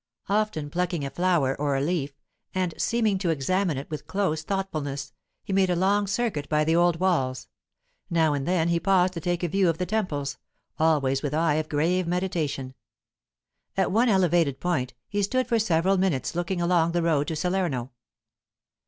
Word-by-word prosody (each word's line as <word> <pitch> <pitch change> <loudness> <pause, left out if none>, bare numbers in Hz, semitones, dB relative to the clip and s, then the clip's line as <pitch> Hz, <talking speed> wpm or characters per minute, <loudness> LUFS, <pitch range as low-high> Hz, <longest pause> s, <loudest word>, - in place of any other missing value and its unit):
Often 200 -8 0
plucking 175 -3 -1
a 135 - -5
flower 170 -5 +1
or 145 -2 +1
a - - +1
leaf, 145 -3 -2 0.4
and 185 -3 0
seeming 220 -4 +1
to 185 -3 -1
examine 165 +2 0
it 135 - -5
with 150 -1 -6
close 175 -3 0
thoughtfulness, 155 -7 -3 0.3
he 195 - -4
made 190 -1 +3
a 180 - +2
long 200 +3 +2
circuit 200 -8 -1
by 150 0 +2
the 160 +2 +2
old 175 -1 +3
walls; 135 -9 0 0.6
now 160 -3 +2
and 140 -1 -2
then 170 -2 +2
he 170 0 +2
paused 185 -1 +3
to 170 - -4
take 175 +1 -1
a - - +2
view 190 +1 +2
of 165 - 0
the 180 - -1
temples, 150 -10 -2 0.4
always 140 -4 +2
with 150 0 -2
eye 160 -1 +2
of 155 0 -2
grave 170 +4 +1
meditation. 165 -7 -2 1.0
At 190 - +2
one 230 +5 +3
elevated 175 -8 +2
point, 130 -8 -1
he 205 - -1
stood 255 +6 +1
for 235 -2 +1
several 190 -1 +2
minutes 180 -9 0
looking 175 +1 -2
along 170 -1 +2
the 175 -1 +1
road 150 -4 +1
to 160 - -2
Salerno. 170 -7 -1
170 Hz, 180 wpm, -26 LUFS, 150-190 Hz, 1.0 s, made